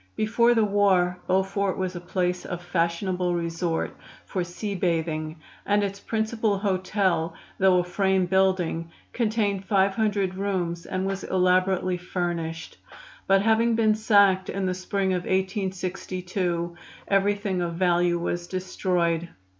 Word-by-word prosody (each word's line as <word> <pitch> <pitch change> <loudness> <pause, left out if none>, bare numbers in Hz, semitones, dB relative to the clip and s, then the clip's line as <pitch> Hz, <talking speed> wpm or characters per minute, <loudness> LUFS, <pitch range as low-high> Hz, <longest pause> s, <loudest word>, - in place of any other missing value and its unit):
Before 235 +2 +3
the 225 -2 +4
war 190 -3 +2
Beaufort 190 +1 +1
was 185 -1 -2
a 175 - -5
place 180 0 -1
of 175 -1 -6
fashionable 175 +1 0
resort 170 0 -2 0.3
for 185 - -2
sea 190 +4 -5
bathing, 160 -4 -1 0.3
and 205 0 +2
its 200 0 -3
principal 220 -1 -1
hotel, 185 -4 0 0.2
though 190 -1 +5
a 180 - +2
frame 190 +1 +1
building, 180 -3 +1 0.2
contained 215 -4 0
five 195 0 +2
hundred 205 -3 0
rooms 185 -3 -2
and 185 0 -2
was 195 0 -3
elaborately 185 0 +2
furnished; 175 -2 -4 0.5
but 195 0 +4
having 225 +1 +3
been 220 -1 +3
sacked 200 -3 +4
in 195 -1 -2
the 185 - 0
spring 190 +1 -1
of 180 -1 -2
1862 185 -2 -2 0.3
everything 200 -1 +1
of 170 -1 -2
value 175 -1 +2
was 175 0 -3
destroyed. 175 -2 -1
185 Hz, 130 wpm, -25 LUFS, 175-200 Hz, 0.5 s, though